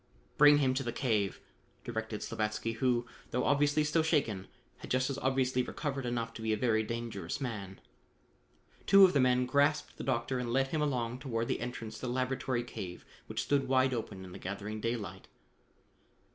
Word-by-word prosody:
"Bring 145 0 +8
him 135 -3 +2
to 130 - -1
the 120 -3 -2
cave," 110 -6 0 0.4
directed 110 -2 -4
Slavatsky, 110 +1 -2
who, 120 -2 +1 0.2
though 125 - 0
obviously 145 +1 +3
still 150 +2 +2
shaken, 140 - 0 0.3
had - - -10
just 130 +2 +1
as 140 - -4
obviously 130 -1 +1
recovered 135 0 -3
enough 115 -1 -2
to 115 - -8
be 110 0 0
a 110 - +2
very 110 -1 +2
dangerous 115 +1 -4
man. 105 -8 -5 1.1
Two 195 0 +9
of 185 - +2
the 140 - +3
men 125 -1 +3
grasped 145 +4 +1
the - - -5
doctor 130 0 0
and 120 -1 -3
led 135 +2 +2
him 155 0 -1
along 125 -4 -1
toward 115 -4 -2
the - - 0
entrance 115 -3 -5
to 130 - -4
the 120 - -1
laboratory 130 -1 -1
cave 90 -7 -7 0.2
which - - -2
stood 140 -1 +1
wide 130 0 +3
open 100 -5 -5
in 90 - -10
the - - -9
gathering 105 +3 -5
daylight. 115 -2 -4
125 Hz, 185 wpm, -32 LUFS, 115-135 Hz, 1.1 s, Two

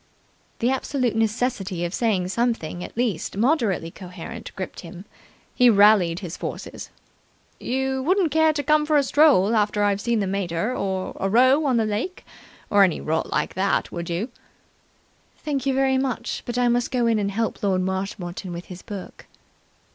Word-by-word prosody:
The 240 +3 +1
absolute 260 -3 -1
necessity 215 -5 -1
of 170 - -4
saying 200 -6 0
something 190 -6 -1
at - - -10
least 215 -7 -1
moderately 225 - +1
coherent 180 -2 -9
gripped 185 - -6
him. 175 +2 -10 0.5
He 250 -1 +5
rallied 200 -5 +5
his 175 -3 -6
forces. - - -7 0.7
"You 265 +1 -1
wouldn't 355 +2 +2
care 320 +1 +4
to 295 -1 -3
come 305 +2 +3
for 305 -1 +3
a 285 - +4
stroll, 260 -7 +4
after 210 -1 +1
I've 200 -1 +1
seen 235 0 0
the 200 - 0
mater, 190 +3 -2
or 190 -1 -3
a 195 - 0
row 260 +7 +4
on 255 -3 +2
the 225 - +2
lake, 215 - -3 0.5
or 205 -1 +6
any 180 -4 +2
rot 160 +1 -1
like - - -1
that, 195 +2 0
would 170 -1 -5
you?" 180 +9 -2 1.1
"Thank 280 -3 -3
you 270 - +2
very 265 0 +2
much, 255 -3 -2
but 240 0 -3
I 245 0 +3
must 240 0 +1
go 250 -2 0
in 225 -2 +2
and 200 -1 0
help 225 +3 -2
Lord 190 -2 +1
Marshmoreton 190 -1 -4
with 170 +1 -6
his 180 - -11
book." 200 -4 -9
215 Hz, 175 wpm, -23 LUFS, 185-255 Hz, 1.1 s, or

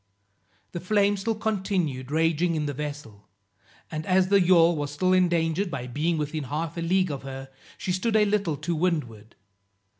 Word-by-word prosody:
The 175 - -5
flames 200 +2 +1
still 225 +3 -1
continued 190 -11 -2
raging 165 +2 +1
in 155 -1 -1
the 145 - -2
vessel, 145 -8 -7 0.6
and 155 -1 -4
as 185 0 +3
the 200 -1 +5
yawl 170 -2 +5
was 145 -1 -3
still 185 +6 +1
endangered 175 0 +2
by 125 -7 -5
being 155 +7 -1
within 150 0 -3
half 155 +5 -3
a 170 - -4
league 185 +1 +1
of 140 - -5
her, 135 0 -8 0.3
she 185 - -3
stood 215 +5 0
a 215 -1 +5
little 200 -7 0
to 175 - -3
windward. 150 - -2
165 Hz, 175 wpm, -26 LUFS, 145-185 Hz, 0.6 s, the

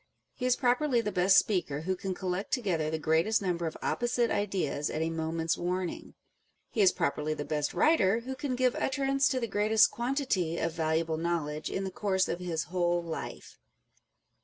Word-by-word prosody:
He 250 - -2
is 250 - +4
pro 245 -2 +3
perly 265 -2 +1
the 210 - -2
best 185 +1 +4
speaker 170 -8 +1
who 185 +3 -1
can 185 0 -4
collect 185 +2 -3
together 185 - 0
the 160 - -1
greatest 160 +8 +2
number 175 -3 -1
of 160 - -6
opposite 240 -1 0
ideas 190 -8 -1
at 155 - -2
a 165 - -1
moment's 165 0 -1
warning: 180 0 -3 0.6
he 220 - 0
is 190 -2 +6
properly 155 -3 -1
the 145 - -5
best 150 -2 -1
writer 225 -9 +3
who 260 +3 -5
can 265 -1 -3
give 255 -1 +2
utterance 275 0 +1
to 260 - 0
the 235 - -1
greatest 215 +1 +3
quantity 235 - -1
of 165 - -1
valuable 160 0 0
knowledge 160 -2 -2
in 195 - -2
the 190 - -4
course 190 -1 0
of 175 - -3
his 170 -3 -2
whole 175 -1 0
life. 165 -1 -7
185 Hz, 185 wpm, -30 LUFS, 165-235 Hz, 0.6 s, is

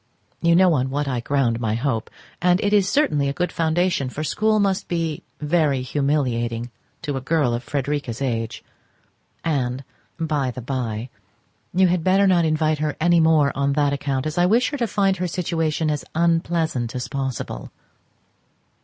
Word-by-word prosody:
You 170 0 +4
know 185 -1 +5
on 130 -2 0
what 145 +2 -2
I 130 -3 -1
ground 120 -2 0
my 110 -2 -1
hope, 115 -2 -1 0.3
and 180 +1 +3
it 205 0 +1
is 200 -2 +4
certainly 150 - +2
a - - -2
good 180 +4 -1
foundation, 165 -3 0
for 155 +4 -5
school 215 +6 +1
must 195 -1 0
be 165 -3 -2 0.2
very 150 -4 +1
humiliating 125 -4 -1 0.3
to 145 -5 -2
a - - -4
girl 145 -3 +1
of 120 - -2
Frederica's 140 -3 -3
age. 115 -4 -3 0.8
And, 135 -4 -1 0.4
by 150 -5 0
the 125 - -6
by, 120 -2 -3 0.6
you 190 +2 +4
had 175 -2 +1
better 190 +2 +4
not 180 -3 +4
invite 155 -1 +1
her 150 -2 -1
any 175 +1 +4
more 160 -3 +4
on 140 0 0
that 145 -1 +2
account, 140 -1 -2
as 155 +3 -2
I 175 - +4
wish 235 +8 +3
her 290 - -3
to 235 - +1
find 195 -2 +1
her 180 0 -1
situation 160 -3 -1
as 150 - -2
unpleasant 165 -7 0
as 125 - -3
possible. 135 - -4
150 Hz, 170 wpm, -22 LUFS, 130-170 Hz, 0.8 s, know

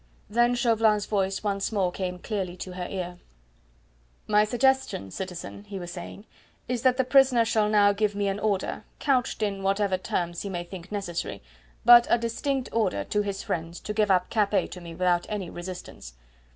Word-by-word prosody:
Then 240 +2 +3
Chauvelin's 225 -3 +3
voice 195 -1 -1
once 200 0 -1
more 190 -4 +1
came 180 -1 -4
clearly 185 -2 -4
to 185 - -6
her 180 0 -4
ear: 180 -2 -5 1.1
"My 210 0 +4
suggestion, 255 - +1
citizen," 185 - -6
he 200 -1 -7
was 175 -2 -6
saying, 185 +3 -8 0.4
"is 250 -2 -1
that 255 0 +3
the 260 - +3
prisoner 255 -2 +5
shall 215 -2 +2
now 205 -1 +5
give 205 0 0
me 205 0 0
an 195 +1 -1
order 205 -3 -1
couched 255 -5 0
in 200 -2 -1
whatever 195 -1 +1
terms 175 -2 -2
he 200 - -4
may 175 -2 -3
think 180 +1 -10
necessary 195 - -4 0.4
but 240 0 +9
a - - +5
distinct 250 +3 -2
order 195 - 0
to 210 - 0
his 200 -1 -4
friends 165 +1 -4
to 210 - -4
give 210 -1 +2
up 180 -1 +2
Capet 205 -3 +1
to 180 - -8
me 170 -1 -9
without 175 -1 +1
any 200 -5 -4
resistance. 175 - -8
200 Hz, 180 wpm, -26 LUFS, 180-220 Hz, 1.1 s, but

